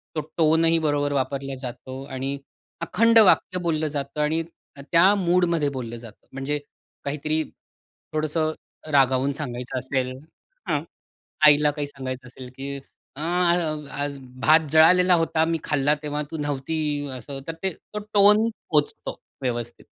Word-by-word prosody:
तो 155 - 0 0.2
टोनही 165 +1 +4
बरोबर 145 -2 0
वापरला 135 0 -2
जातो 130 +1 -7
आणि 135 0 -4 0.4
अखंड 230 +6 +4
वाक्य 185 -3 +4
बोललं 160 -3 0
जातं 145 0 -3
आणि 160 +2 +1 0.3
त्या 170 +7 +4
मूडमध्ये 175 -5 +2
बोललं 120 -4 -6
जातं. 115 -3 -14
म्हणजे 135 +2 -2 0.5
काहीतरी 155 +2 -1 0.7
थोडंसं 155 +1 0 0.4
रागावून 135 0 +3
सांगायचं 125 -3 -5
असेल. 130 0 -2 0.6
हां - - +1 0.6
आईला 150 0 +6
काही 145 -1 -4
सांगायचं 130 -2 -6
असेल 125 0 -11
की 140 +1 -5 0.4
अ, - - -6 0.7
"आज 145 0 -3 0.2
भात 155 +4 +6
जळालेला 180 +3 +6
होता, 165 -1 +1
मी 165 0 0
खाल्ला 145 0 +2
तेव्हा 150 0 -2
तू 160 - -4
नव्हती." 145 0 -2
असं 135 +2 -8
तर 165 - -3
तो 190 +3 -4
टोन 210 +2 +6 0.2
पोहचतो 150 -2 0 0.2
व्यवस्थित. 120 -2 -4
145 Hz, 130 wpm, -24 LUFS, 135-160 Hz, 0.7 s, आईला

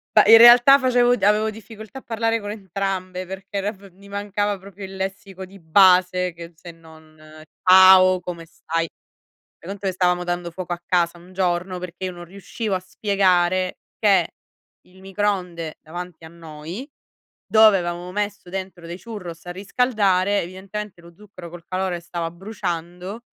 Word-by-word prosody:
Beh, 215 +1 +6
in 225 - +11
realtà 240 +4 +8
facevo 245 -2 +3
avevo 215 -1 +2
difficoltà 220 +3 -11
a - - -19
parlare 225 0 -1
con 205 -1 -7
entrambe 190 -2 -4
perché 190 +1 -6
r 205 +3 -2
f 195 0 -17
mi 200 +3 -18
mancava 205 0 -2
proprio 195 +1 -11
il 190 0 -10
lessico 190 0 -6
di 195 +1 -16
base 180 +1 +4
che 170 0 -11
se 170 +1 -11
non 160 -1 -18 0.5
"ciao, 185 0 +7
come 175 -2 -8
stai." 165 +1 -4 0.7
Fai 170 - -12
conto 195 0 -5
che - - +1
stavamo 180 -1 +1
dando 175 -1 -4
fuoco 180 0 -7
a 175 - -8
casa 175 -1 0
un 180 +2 -17
giorno 180 0 -1
perché 180 +1 -7
io 185 - -3
non 175 -1 -10
riuscivo 200 +3 -5
a 185 - -2
spiegare 185 -1 0 0.2
che 195 -5 +3 0.6
il 185 +1 -20
microonde 185 -5 -3
davanti 175 0 -9
a - - -9
noi 165 - -9 0.6
dove 215 -2 +6
avevamo 175 +1 -5
messo 205 -2 -4
dentro 185 -2 -7
dei 175 +2 -8
churros 180 -8 -9
a 175 - -6
riscaldare, 200 -1 +1
evidentemente 190 +1 -8
lo 170 0 -16
zucchero 190 -4 -12
col 175 0 -12
calore 185 -1 -2
stava 170 -1 -5
bruciando 180 +2 -6
185 Hz, 160 wpm, -22 LUFS, 175-205 Hz, 0.7 s, in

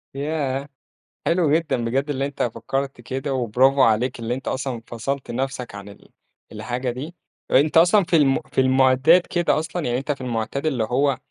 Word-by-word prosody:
ياه! 140 -1 -2 0.6
حلو 165 -4 +2
جدًا 155 -8 0
بجد 135 +5 -1
اللي 135 -1 -1
أنت 140 - -3
فكّرت 135 +2 -3
كده، 135 +3 -4
وبرافو 130 +3 +2
عليك 120 +1 +2
اللي 115 +1 -2
أنت 130 - -6
أصلًا 130 -3 -3
فصَلْت 130 +3 -4
نفْسك 130 -3 -4
عن 100 0 -9
ال 100 - -16 0.4
الحاجة 120 +4 -3
دي، 150 +8 -7 0.4
أنت 150 +4 +4
أصلًا 180 +4 +5
في 175 - +1
الم 140 -3 +4
في - - +2
المعتاد 130 +6 +4
كده 175 -3 0
أصلًا 165 +1 -4
يعني 120 0 0
أنت 140 +3 -3
في 135 - -5
المعتاد 125 +4 -3
اللي 130 -7 0
هو، 130 +3 +1
135 Hz, 175 wpm, -22 LUFS, 125-145 Hz, 0.6 s, أصلًا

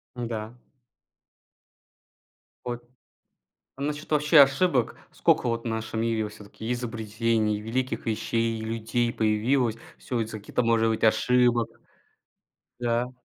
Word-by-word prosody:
Н-да. 115 -2 -4 2.1
Вот. 120 -1 -4 0.9
А 135 - -10
насчёт 150 +1 -3
вообще 150 +1 +5
ошибок. 135 -2 +3 0.2
Сколько - - +2
вот 115 0 -1
в - - -21
нашем 110 0 -2
мире 115 -1 0
вот 105 -1 -6
всё-таки 110 +3 -7
изобретений, 115 -2 -1
великих 125 +4 -2
вещей, 115 0 -1
людей 115 +2 -1
появилось. 115 +2 +1 0.2
Всё 125 - -3
из-за 110 -1 -5
каких-то, 100 - -1
может 115 -1 +3
быть, 110 0 -1
ошибок. 120 +1 +3 1.1
Да. 120 +1 0
115 Hz, 115 wpm, -26 LUFS, 110-125 Hz, 2.1 s, вообще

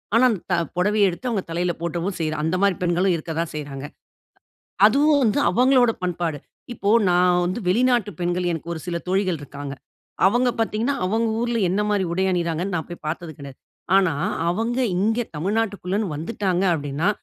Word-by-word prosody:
ஆனா 235 - +5
அந்த 215 -6 -1
த - - +4 0.2
புடவைய 205 +2 +3
எடுத்து 185 +9 -6
அவுங்க 215 -5 0
தலைல 175 +2 0
போட்டவும் 170 +3 -3
செய்றா. 155 -1 -1
அந்த 160 +3 0
மாரி 200 -2 +3
பெண்களும் 180 +2 +2
இருக்க 165 0 -6
தான் 165 -1 -1
செய்றாங்க. 145 -2 -6 1.0
அதுவும் 285 +6 +4
வந்து 220 +3 +2
அவங்களோட 250 -1 +4
பண்பாடு. 170 -3 -2 0.4
இப்போ 205 -3 -2 0.2
நான் 180 0 +4
வந்து 185 +6 -2
வெளிநாட்டு 240 +1 +2
பெண்கள், 175 +1 0
எனக்கு 165 +1 -5
ஒரு 165 - -6
சில 175 -1 -2
தோழிகள் 185 -2 +1
இருக்காங்க. 140 0 -7 0.5
அவங்க 245 +5 +2
பார்த்ததீங்கன்னா, 225 +4 0
அவங்க 225 +4 +1
ஊர்ல 240 -1 0
என்ன 195 +4 +1
மாரி 200 -2 +1
உடை 190 +2 +1
அணிகிறாங்கன்னு 175 +1 -1
நான் 160 - -3
போய் 175 - -9
பார்த்தது 165 +1 -4
கெடையாது. 140 -2 -10 0.4
ஆனா, 185 -5 +3 0.4
அவங்க 230 +7 -1 0.2
இங்கே, 225 +5 +1
தமிழ்நாட்டுக்குள்ளேன்னு 200 +1 -1
வந்துட்டாங்க, 185 +3 -1
அப்டின்னா, 145 +4 -1
185 Hz, 165 wpm, -23 LUFS, 170-220 Hz, 1.0 s, ஆனா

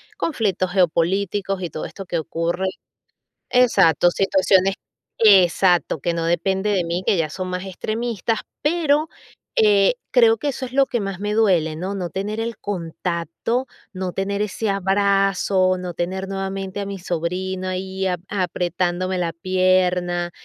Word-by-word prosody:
conflictos 200 - -1
geopolíticos, 195 +2 +1
y 175 - -4
todo 155 - -5
esto 195 - -8
que 170 -2 -2
ocurre. 170 +4 -2 0.8
Exacto, 195 -9 +4
situaciones 195 0 +3 0.4
Exacto. 185 -5 +4
Que 170 +4 -1
no 165 -1 -2
depende 190 +4 0
de 185 -3 +1
mí, 170 +2 -2
que 195 - +3
ya 160 -2 0
son 185 +3 -4
más 180 +1 -4
extremistas. 220 +3 -2 0.2
Pero, 310 -1 +2 0.5
eh, 205 - +4 0.2
creo 460 -2 +5
que 295 - -4
eso 265 0 -4
es 250 - -14
lo 275 0 +4
que 240 - -1
más 195 -2 -4
me 210 +1 -2
duele, 180 -8 +2
¿no? 185 +5 -4
No 180 -3 -3
tener 200 +5 -4
el 230 -1 -3
contacto, 175 - -3 0.3
no 185 -1 -3
tener 200 +2 -2
ese 210 +1 -2
abrazo, 195 -1 +2
no 180 -1 -5
tener 190 +2 -3
nuevamente, 195 0 -4
a 200 - -3
mi 200 0 -5
sobrino 180 +2 -3
ahí, 190 +1 -3
a 180 -1 0
apretándome 180 -1 -1
la 170 -2 -1
pierna. 180 -1 +1
190 Hz, 150 wpm, -21 LUFS, 175-200 Hz, 0.8 s, creo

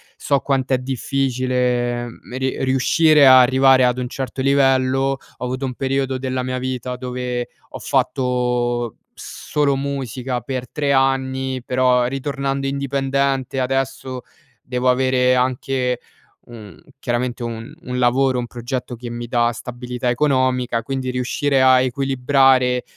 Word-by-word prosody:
so 140 - 0
quant'è 135 -2 0
difficile 125 -2 -1
m 120 +1 -11 0.3
riuscire 140 +3 +4
ad 130 - +9
arrivare 130 0 +5
ad 125 0 +1
un 125 -1 -3
certo 130 +1 -5
livello, 135 0 +2 0.2
ho - - -8
avuto 130 +2 -3
un 125 - -3
periodo 135 0 -1
della 130 0 -3
mia 130 0 -3
vita 125 -1 -4
dove 125 -1 -4 0.2
ho - - -8
fatto 125 -2 0 0.2
solo 145 -2 -1
musica 135 -2 -3
per 125 0 -5
3 145 -2 -1
anni, 130 -1 0
però 125 -1 +2
ritornando 135 +1 -2
indipendente 135 -1 -1
adesso 130 0 -2 0.4
devo 125 0 0
avere 125 0 +3
anche 125 0 0 0.5
un 110 -6 -12 0.2
chiaramente 120 -1 -2
un 115 +3 -6
un 125 -5 -4
lavoro, 125 +1 +2
un 120 - -4
progetto 120 +1 -5
che 120 +1 -8
mi 120 0 -6
dà 120 0 +2
stabilità 125 +1 -5
economica. 125 -3 +1
Quindi 130 +1 -3
riuscire 130 +2 0
a 130 -1 +6
equilibrare, 130 -1 +2
130 Hz, 130 wpm, -20 LUFS, 125-135 Hz, 0.5 s, ad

